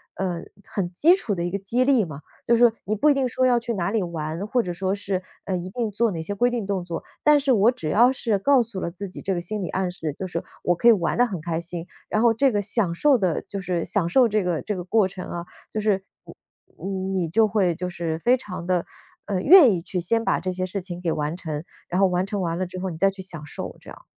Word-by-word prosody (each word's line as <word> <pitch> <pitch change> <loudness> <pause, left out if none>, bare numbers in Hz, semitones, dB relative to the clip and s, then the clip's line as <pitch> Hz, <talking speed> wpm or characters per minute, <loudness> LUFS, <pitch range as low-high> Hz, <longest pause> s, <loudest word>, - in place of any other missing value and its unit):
呃， 180 -3 -2 0.2
很 185 -4 -3
基 290 - +5
础 205 - -2
的 170 - -2
一 175 - -2
个 200 - -2
激 235 +6 +1
励 255 -7 +3
嘛。 150 -2 -9 0.2
就 235 0 +4
是 235 -2 +5
你 210 - -1
不 300 +8 +3
一 - - +6
定 270 -2 +1
说 255 +2 +1
要 245 -1 +4
去 235 0 -3
哪 175 -3 -1
里 220 -3 +1
玩， 165 +2 -4
或 245 +2 +2
者 180 - -4
说 190 +2 -1
是， 195 -2 -3 0.2
呃， 190 - -1
一 180 +1 -5
定 225 0 -2
做 225 +1 +1
哪 165 -2 -4
些 205 +5 -3
规 245 +4 +3
定 240 -4 -2
动 195 -2 -2
作， 170 -2 -5 0.2
但 300 -1 +6
是 275 -1 +1
我 225 +2 +5
只 160 -11 -5
要 240 +9 +5
是 225 -5 0
告 265 +5 +4
诉 220 -4 -7
了 170 - -3
自 195 +3 -6
己 - - -8
这 195 - -1
个 175 - -1
心 210 +3 -4
理 180 - -3
暗 185 -1 -1
示， 160 -4 -4
就 190 - -4
是 170 -2 -4 0.2
我 175 - +2
可 235 - +2
以 - - +10
玩 180 -3 +1
得 245 - +5
很 195 -7 -4
开 165 0 -2
心， 170 0 -7 0.2
然 215 - +1
后 235 -1 +5
这 270 +3 +3
个 205 -2 0
享 195 -4 +1
受 285 +5 +4
的 185 -6 0
就 200 -1 -5
是 180 -2 -2
享 175 -5 0
受 255 +4 +5
这 215 -2 +1
个 175 -3 -1
这 210 - -3
个 180 - -5
过 200 +1 +2
程 180 -1 -8
啊 170 0 -5 0.3
就 215 - -2
是， 205 -3 +1 0.2
呃， - - -11 0.5
嗯， 190 0 -3
你 175 -4 -1
就 220 +4 +4
会 195 -5 +2
就 180 +2 -4
是 165 -2 -3
非 245 +8 +4
常 180 -8 -7
地， 180 -1 0 0.4
呃， 195 -3 -1
愿 310 - +8
意 175 -3 -1
去 180 0 -3
先 225 +6 0
把 - - +2
这 185 - -2
些 185 0 -2
事 190 +1 -4
情 175 -1 -6
给 170 -3 -1
完 150 +3 -2
成， 155 -4 -5 0.2
然 180 +2 0
后 195 - +6
完 180 0 0
成 200 0 -3
完 170 -1 -1
了 185 - 0
之 185 +1 -8
后 185 +1 -3
你 160 - -7
再 195 +3 +4
去 195 0 -8
享 170 -5 -7
受 - - -7
这 - - -14
样。 - - -12
190 Hz, 300 characters per minute, -24 LUFS, 175-225 Hz, 0.5 s, 以